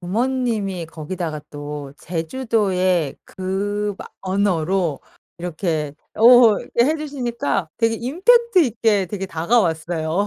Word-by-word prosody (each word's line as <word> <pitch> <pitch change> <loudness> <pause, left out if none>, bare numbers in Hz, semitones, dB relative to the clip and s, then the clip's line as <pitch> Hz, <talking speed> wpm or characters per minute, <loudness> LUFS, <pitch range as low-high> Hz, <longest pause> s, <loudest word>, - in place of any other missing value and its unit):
부모님이 215 -3 -1
거기다가 160 0 -5
또 145 -1 -7
제주도의 185 - 0
그 205 +2 -3
막 - - -10
언어로 185 -4 0 0.4
이렇게 160 -4 -2 0.2
어 235 -1 +7
이렇게 235 - +1
해 310 +3 +1
주시니까 240 - -2
되게 230 -1 +2
임팩트 380 - +3
있게 220 -5 +1
되게 195 0 -4
다가왔어요. 165 -1 0
195 Hz, 255 characters per minute, -21 LUFS, 165-235 Hz, 0.4 s, 어